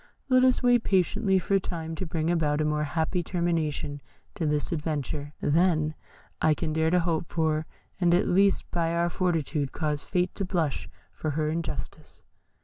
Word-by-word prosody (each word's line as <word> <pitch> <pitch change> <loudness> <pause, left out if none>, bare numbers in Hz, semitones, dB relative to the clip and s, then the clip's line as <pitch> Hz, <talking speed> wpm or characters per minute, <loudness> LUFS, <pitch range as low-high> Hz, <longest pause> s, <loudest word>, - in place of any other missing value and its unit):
Let 255 -1 +5
us 255 0 +3
wait 245 -1 +4
patiently 190 +1 +2
for 195 +2 +2
time 165 -3 -5
to 175 +3 -4
bring 160 0 -1
about 150 -3 +1
a 155 - +1
more 150 0 0
happy 160 +4 -1
termination 160 -5 -1 0.3
to 160 - -2
this 150 +2 0
adventure 150 -2 -3
than 155 -1 +2 0.5
I 155 -1 +4
can 155 0 -2
dare 160 0 +2
to 180 +1 +3
hope 165 -1 -1
for, 160 -2 0 0.3
and 175 -2 +3
at 180 - +2
least 195 +2 +2
by 170 -1 0
our 170 0 +1
fortitude 160 -6 -1
cause 150 -2 -1
Fate 180 -1 -1
to 200 - -3
blush 170 -6 -1 0.2
for 155 - -3
her 155 -1 +1
injustice." 165 0 -6
165 Hz, 170 wpm, -27 LUFS, 155-180 Hz, 0.5 s, Let